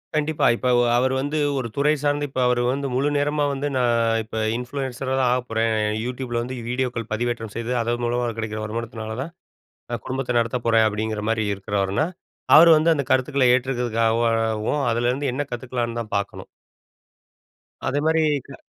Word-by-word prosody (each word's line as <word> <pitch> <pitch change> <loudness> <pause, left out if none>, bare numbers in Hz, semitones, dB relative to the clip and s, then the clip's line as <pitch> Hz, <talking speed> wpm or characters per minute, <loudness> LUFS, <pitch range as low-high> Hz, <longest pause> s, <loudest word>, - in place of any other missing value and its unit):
கண்டிப்பா. 155 0 +1
இப்போ 125 - -1 0.3
அவர் 130 +1 +2
வந்து 150 +2 -1 0.2
ஒரு 125 -3 -2
துறை 145 +2 +3
சார்ந்த 145 0 +1
இப்போ 130 -1 -2
அவரு 125 -1 +2
வந்து 140 +1 -2
முழு 140 +3 +2
நேரமா 145 +1 +1
வந்து 140 +2 -2
"நான் 115 -2 +2
இப்ப 110 +1 -7 0.2
இன்ஃப்ளூயன்சரா 130 +1 -4
தான் 125 -2 +3
ஆகப் 125 0 -2
போறேன். 115 0 +1 0.4
யூடியூப்ல 125 -1 -3
வந்து 130 +2 -5
வீடியோக்கள் 125 -3 -2
பதிவேற்றம் 115 -1 -2
செய்து 115 +1 -2
அதன் 120 +1 -1
மூலமா 120 +1 0
கிடைக்கிற 110 -1 -4
வருமானத்தினால 110 0 -5
தான் 160 +5 -6 0.6
நான் 120 - -4
குடும்பத்தை 130 -2 -2
நடத்தப் 115 +1 -2
போறேன்." 115 -1 +4
அப்படிங்கிற 110 0 -2
மாதிரி 110 -1 +1
இருக்கிறவர்னா, 100 +5 -1 0.5
அவர் 165 +2 +9
வந்து 160 +2 +3
அந்த 140 -3 -1
கருத்துக்களை 130 0 +2
ஏற்றுக்கிறதுக்காகவும் 115 -1 +1
அதுலேருந்து 125 +4 0
என்ன 145 - -2
கத்துக்கலாம்ன்னு 120 -1 -3
தான் 110 - -9
பார்க்கணும். 100 - -5 1.4
அதேமாதிரி, 155 +4 +2 0.2
க 140 - -11
120 Hz, 155 wpm, -23 LUFS, 115-135 Hz, 1.4 s, அவர்